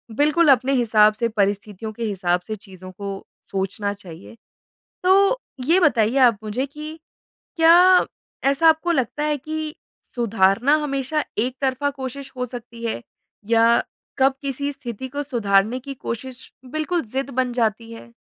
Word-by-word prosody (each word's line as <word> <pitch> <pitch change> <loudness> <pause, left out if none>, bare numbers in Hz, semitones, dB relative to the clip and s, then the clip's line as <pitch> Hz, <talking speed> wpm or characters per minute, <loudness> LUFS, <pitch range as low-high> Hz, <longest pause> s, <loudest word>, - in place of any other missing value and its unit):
बिल्कुल 305 +4 +3
अपने 270 +1 +3
हिसाब 215 -4 +4
से 230 +2 -1
परिस्थितियों 205 0 -2
के 230 - -6
हिसाब 180 -4 0
से 215 - -3
चीज़ों 185 -2 -12
को 195 +1 -7 0.3
सोचना 200 +1 -2
चाहिए। 185 0 -12 0.7
तो 390 +6 +4 0.3
ये 340 +7 +4
बताइए 240 -7 +3
आप 230 -4 -2
मुझे 230 +6 -2
कि 305 +3 -9 0.6
क्या 350 +3 +6 0.4
ऐसा 305 +4 +4
आपको 320 +2 +3
लगता 270 0 -1
है 300 -1 +1
कि 310 +2 -5 0.4
सुधारना 225 +3 +3
हमेशा 285 +1 -1
एकतरफ़ा 260 +4 -1
कोशिश 270 0 -7
हो 250 - -2
सकती 235 -1 -9
है? 220 - -3 0.5
या 230 0 +4 0.4
कब 265 0 +4
किसी 280 +1 -3
स्थिति 260 -2 -7
को 285 +3 -4
सुधारने 225 -4 +1
की 275 +1 -7
कोशिश 250 +1 -7
बिल्कुल 310 +6 -2
ज़िद 265 +4 -4
बन 255 -1 -1
जाती 230 -1 -1
है? 235 +1 -12
250 Hz, 145 wpm, -22 LUFS, 215-285 Hz, 0.7 s, क्या